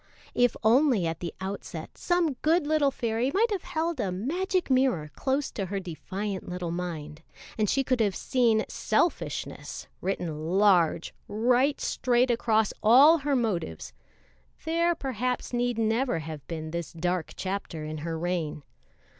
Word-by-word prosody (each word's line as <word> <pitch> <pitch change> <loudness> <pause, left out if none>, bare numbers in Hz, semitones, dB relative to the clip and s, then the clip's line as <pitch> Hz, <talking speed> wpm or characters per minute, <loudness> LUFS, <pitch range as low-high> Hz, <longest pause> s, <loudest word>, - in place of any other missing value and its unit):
If 245 -1 +3
only 240 - +4
at 165 -1 -2
the 170 - -4
outset 190 +1 -6
some 350 -4 +1
good 325 +1 +3
little 300 -2 +3
fairy 235 -1 -1
might 445 +3 +3
have 395 -4 -1
held 320 -1 -2
a 195 -5 0
magic 345 - -1
mirror 255 - +2
close 270 - -1
to 195 -3 -3
her 200 +2 -2
defiant 190 +3 -5
little 180 -1 -3
mind, 165 -3 -5 0.3
and 215 -2 +1
she 270 - +2
could 255 -1 0
have 205 -4 +2
seen 230 -4 +2
"selfishness" 345 - -2 0.2
written 170 -2 -2
large, 180 -5 +3
right 250 +6 +2
straight 250 0 +2
across 220 -2 +2
all 275 +9 +7
her 285 0 0
motives, 185 - -2 0.7
there 335 +1 +2
perhaps 250 -3 -3
need 245 -1 0
never 225 -1 +1
have 155 -3 -7
been 160 -2 -5
this 170 -3 -4
dark 175 +1 -2
chapter 185 -5 -4
in 155 0 -5
her 165 +1 -3
reign. 165 -3 -2
220 Hz, 145 wpm, -27 LUFS, 175-265 Hz, 0.7 s, all